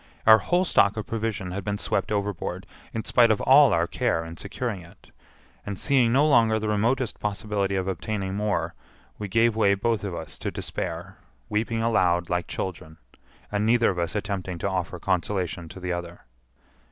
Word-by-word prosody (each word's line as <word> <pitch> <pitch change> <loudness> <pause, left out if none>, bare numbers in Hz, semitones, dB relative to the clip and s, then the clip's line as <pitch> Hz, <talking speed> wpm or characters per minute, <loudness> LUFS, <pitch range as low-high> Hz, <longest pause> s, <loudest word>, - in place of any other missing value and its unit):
Our 110 0 +8
whole 175 - +1
stock 100 - +3
of 110 - -3
provision 110 -5 -3
had 100 +2 -4
been 105 0 -2
swept - - -1
overboard 100 -3 -2 0.3
in 115 - -4
spite 120 -1 +5
of 110 - +2
all 135 0 +7
our 85 -3 +2
care 80 -1 -1
in 80 0 -8
securing 100 +2 -4
it; 85 0 -18 0.5
and 100 -1 -5
seeing 130 -3 +3
no 140 +5 +4
longer 115 -6 +4
the 110 0 -2
remotest 115 +4 0
possibility 100 -1 -1
of 95 0 -1
obtaining 95 +1 -3
more, 100 -5 -1 0.5
we 105 - -4
gave 115 +3 +3
way 100 -3 +3
both 110 +1 -1
of 95 -4 -4
us 80 - -7
to - - -2
despair, - - -5 0.3
weeping 115 +1 -1
aloud 90 -7 +2
like 90 0 0
children, 80 -4 -5 0.5
and 105 0 0
neither 115 0 +4
of 90 - -4
us 85 +3 -2
attempting 100 -4 -3
to 90 - -2
offer 90 -2 -2
consolation 90 -1 -2
to 95 - -10
the 90 -1 -2
other. 85 0 -6
100 Hz, 180 wpm, -25 LUFS, 90-115 Hz, 0.5 s, Our